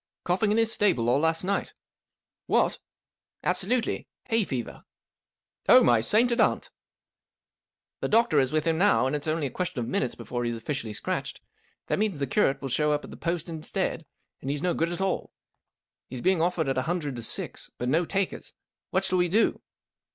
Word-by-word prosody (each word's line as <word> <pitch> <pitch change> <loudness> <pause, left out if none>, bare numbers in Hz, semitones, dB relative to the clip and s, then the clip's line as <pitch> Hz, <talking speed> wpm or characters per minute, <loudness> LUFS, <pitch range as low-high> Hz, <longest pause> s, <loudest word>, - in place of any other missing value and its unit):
Coughing 195 +4 +1
in 215 - +2
his 225 0 +3
stable 180 - +2
all 135 - +3
last 160 +2 +1
night." 195 +2 -2 0.4
" - - -65
What! - - +3
'• - - -11 0.4
" - - -55
Absolutely 245 -2 0 0.2
1 225 - +4
Hay - - +2
fever." 125 -7 -3
,f - - -22 0.9
Oh, - - +9
my 120 -2 +4
sainted 235 - +3
aunt! - - +1 0.5
" - - -66
" - - -67
The - - 0
doctor 225 -8 +4
is 130 0 +2
with 155 0 0
him 165 -1 +1
now, 200 -8 +4
and 130 - 0
it's 145 +1 -3
only 155 -1 0
a 135 - -3
question 180 -1 -3
of 115 - -3
minutes 125 0 -1
before 120 -1 -4
he's 120 -1 -1
officially 115 -1 -4
scratched. 105 - -3 0.5
That - - -1
means 210 -6 0
the 140 - -1
curate 140 -1 +1
wilt 135 - -3
show 150 +3 +2
up 145 0 0
at - - -10
the - - -8
post 170 0 -3
instead, 160 -2 -3 0.3
and 135 - -5
he's 145 0 -2
no 180 -1 +2
good 165 +1 0
at 175 - -4
all. 190 -1 -2 0.7
He 130 - -8
is 120 - -5
being 185 -3 +3
offered 170 -3 +1
at 135 -1 +1
a 130 - -3
hun¬ 175 +1 +1
dred 145 -3 -4
t 120 - -7
O - - -5
six* 115 - -2
but 125 - -3
no 160 +7 +3
takers. 195 +2 -3 0.3
What 190 +1 +1
shall 185 -1 +1
we 180 - +3
do 210 +6 +2
160 Hz, 220 wpm, -27 LUFS, 135-190 Hz, 0.9 s, Oh